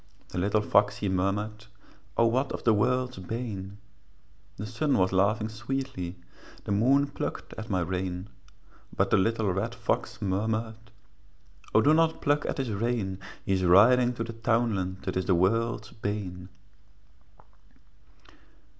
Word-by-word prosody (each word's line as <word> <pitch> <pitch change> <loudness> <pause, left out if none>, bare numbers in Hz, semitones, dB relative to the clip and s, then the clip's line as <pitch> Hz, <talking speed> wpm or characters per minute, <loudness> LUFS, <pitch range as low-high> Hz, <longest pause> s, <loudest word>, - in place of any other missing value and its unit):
The - - -3
little 105 +3 +2
fox 100 0 +3
he 100 - -2
murmured, 105 +4 -1 0.5
'O 115 - +5
what 130 +4 +1
is - - -9
the 115 - +4
world's 125 +2 +1
bane?' 100 -1 -5 0.8
The 105 - -5
sun 130 +6 0
was 95 0 +2
laughing 105 +3 +2
sweetly, 110 -4 -4 0.5
The - - -4
moon 130 +8 +4
plucked 140 - -5
at 110 - -8
my 95 -3 +1
rein; 90 +1 -3 0.7
But - - +2
the - - +5
little 110 -1 +1
red 110 +6 -2
fox 115 0 -2
murmured, 110 +2 -2 0.9
'O 110 - +7
do 150 - +5
not 160 0 +3
pluck 145 +1 +1
at - - -2
his 130 -5 -2
rein, 100 -3 -1 0.3
He 95 - +1
is 95 -1 +1
riding 120 +8 +6
to 115 - -2
the 115 0 -6
townland 110 -5 0
That - - -3
is 95 - -1
the 95 - +3
world's 110 +4 +1
bane.' 100 -4 -5
110 Hz, 145 wpm, -28 LUFS, 95-120 Hz, 0.9 s, O